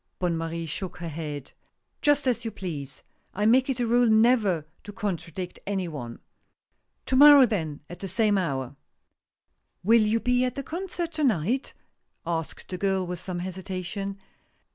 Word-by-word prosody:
Bonne 175 -2 0
Marie 165 0 -3
shook 175 +4 -5
her 170 -1 -5
head. 150 -3 -6 0.5
"Just 290 -1 +3
as 240 -3 +1
you 230 - -2
please; 150 -10 -6 0.3
I 205 +2 0
make 255 +4 +4
it 260 -2 -1
a 240 - +1
rule 240 0 +4
never 220 -7 +4 0.2
to 205 - -8
con 200 -1 -2
tradict 175 +2 -7
any 195 -3 -1
one. 125 -7 -6 0.9
To 260 - 0
morrow 285 0 +9
then, 165 -10 -3
at 175 - -10
the 195 - -5
same 210 +2 +2
hour." 135 -8 -2 0.5
" - - -52
Will 225 +4 +5
you 215 +2 +2
be 250 +1 +2
at 250 - -1
the 275 - -4
concert 345 +2 -4
to 310 -1 -2
night? 235 - 0 0.3
" - - -47
asked 165 -2 -4
the 180 - -5
girl, 190 -2 +1
with 180 -1 -5
some 185 0 -5
hesitation. 190 +2 -5
190 Hz, 175 wpm, -26 LUFS, 170-240 Hz, 0.9 s, morrow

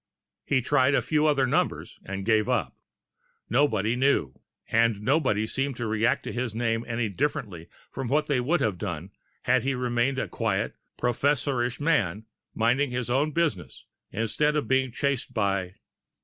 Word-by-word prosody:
He 130 -3 +2
tried 140 0 +3
a - - +3
few 155 0 +2
other 140 -3 +3
numbers, 125 - -1
and 95 0 -5
gave 110 +1 +2
up. 100 - 0 0.8
Nobody 115 -4 +2
knew 125 - +2 0.3
and 115 -2 +2
nobody 125 -3 +1
seemed 135 +3 -2
to 120 - -3
react 115 +6 +1
to - - -5
his 120 -3 -3
name 115 -1 0
any 115 -1 -1
differently 100 - -3 0.2
from 135 -1 -4
what 150 +5 +2
they 140 -4 +1
would 155 +8 +1
have 100 -6 0
done 90 -1 -5 0.3
had 130 0 +3
he 135 +2 -1
remained 125 +1 0
a - - -1
quiet, 110 -2 -1 0.2
professorish 125 0 0
man, 110 - +1 0.3
minding 125 +5 +2
his 125 -1 -3
own 140 +5 +2
business, 115 - -2 0.3
instead 115 +9 0
of 150 - -1
being 130 -1 +2
chased 135 -1 -2
by.... 100 -3 0
120 Hz, 160 wpm, -26 LUFS, 110-140 Hz, 0.8 s, tried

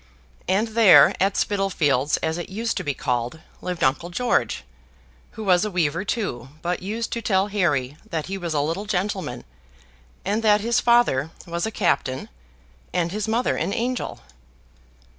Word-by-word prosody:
And 205 +5 +1
there, 220 -2 +7
at 195 +1 +2
Spittlefields, 155 -9 +1
as 160 +2 -1
it 175 - -6
used 225 +4 -2
to - - -2
be 145 -2 -2
called, 125 +5 -2 0.2
lived 180 -2 -3
Uncle 140 +6 +1
George, 235 - 0 0.7
who 220 - -7
was 185 -2 +4
a 215 - -1
weaver 170 -2 0
too, 190 - -3
but 175 +1 -1
used 220 +5 -3
to 235 - -2
tell 195 -2 +1
Harry 150 -9 0
that 160 -5 -2
he 195 - -4
was 170 -4 -3
a 145 - +2
little 165 +8 -2
gentleman, 195 -1 -2 0.8
and 205 +4 0
that 210 -2 +4
his 235 +2 +2
father 235 - +3 0.2
was 170 +3 -2
a - - -4
captain, 135 -10 0 0.6
and 170 -1 0
his 210 +2 -2
mother 230 +3 +1
an 200 - -1
angel. 245 +1 -2
190 Hz, 160 wpm, -23 LUFS, 160-215 Hz, 0.8 s, there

